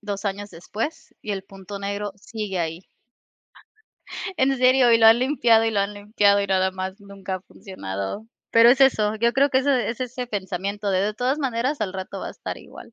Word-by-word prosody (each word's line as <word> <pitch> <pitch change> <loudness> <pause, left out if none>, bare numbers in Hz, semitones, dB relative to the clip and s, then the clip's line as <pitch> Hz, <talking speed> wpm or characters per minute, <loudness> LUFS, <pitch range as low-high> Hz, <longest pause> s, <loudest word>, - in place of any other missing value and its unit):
2 205 0 -5
años 205 +1 -3
después 220 - -6
y 210 - -4
el 195 -1 -5
punto 195 +1 -9
negro 200 0 -4
sigue 205 -2 -5
ahí. 165 +2 -4 1.5
En 270 +1 +3
serio, 255 -1 +5
y 230 - +6
lo 225 - +6
han 225 +1 +8
limpiado, 240 -4 +3
y 225 - +1
lo 205 -2 +1
han 200 +1 -2
limpiado, 205 0 +2
y - - -2
nada 190 -1 +2
más 190 +2 -6
nunca 195 -1 -6
ha - - -11
funcionado. 175 - -7 0.2
Pero 230 +1 +7
es 260 +3 +5
eso, 215 -5 +3
yo 235 +2 +2
creo 275 +3 +3
que 260 - +2
ese 265 -2 +1
es 230 - -5
ese 250 0 -4
pensamiento 200 -1 -3
de 185 -1 +2
de 210 +2 -1
todas 255 +5 0
maneras 265 0 -1
al 200 -3 -2
rato 190 0 -6
va - - -5
a - - -6
estar - - -7
igual. - - -13
210 Hz, 210 wpm, -23 LUFS, 195-240 Hz, 1.5 s, han